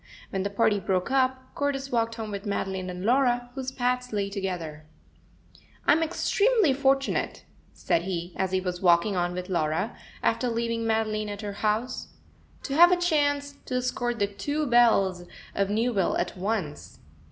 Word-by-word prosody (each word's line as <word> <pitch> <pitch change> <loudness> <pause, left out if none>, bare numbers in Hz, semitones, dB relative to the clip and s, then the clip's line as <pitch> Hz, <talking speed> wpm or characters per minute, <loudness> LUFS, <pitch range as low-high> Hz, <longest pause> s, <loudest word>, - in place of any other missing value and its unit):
When 190 - -1
the 200 - -1
party 205 0 +2
broke 185 +4 -1
up, 260 -1 0
Cordis 275 -1 -2
walked 230 -1 0
home 220 -2 -5
with 200 +1 -5
Madeline 190 -2 -2
and 180 +1 -5
Laura, 245 0 +2
whose 260 -1 -4
paths 250 -1 -1
lay 200 -2 -1
together. 170 -6 -4 1.0
"I'm 310 +3 +5
extremely 400 - +2
fortunate," 270 0 0 0.3
said 165 - 0
he, 175 -1 -4
as 190 -1 -1
he 190 - +2
was 180 -1 -4
walking 175 +2 +4
on 175 0 0
with 180 0 -5
Laura, 170 +3 -1 0.3
after 250 - +1
leaving 230 0 -1
Madeline 215 -1 0
at 205 0 -6
her 205 -1 -4
house, 215 +5 -1 0.6
"to 275 - -4
have 345 +4 +7
a 360 - +4
chance 285 -4 0
to 255 - -3
escort 245 -1 -1
the 205 - +2
two 285 +10 -2
belles 210 -8 +3 0.3
of 200 0 0
Newville 215 -2 +1
at 175 - -2
once." 190 -5 -3
220 Hz, 165 wpm, -27 LUFS, 190-260 Hz, 1.0 s, have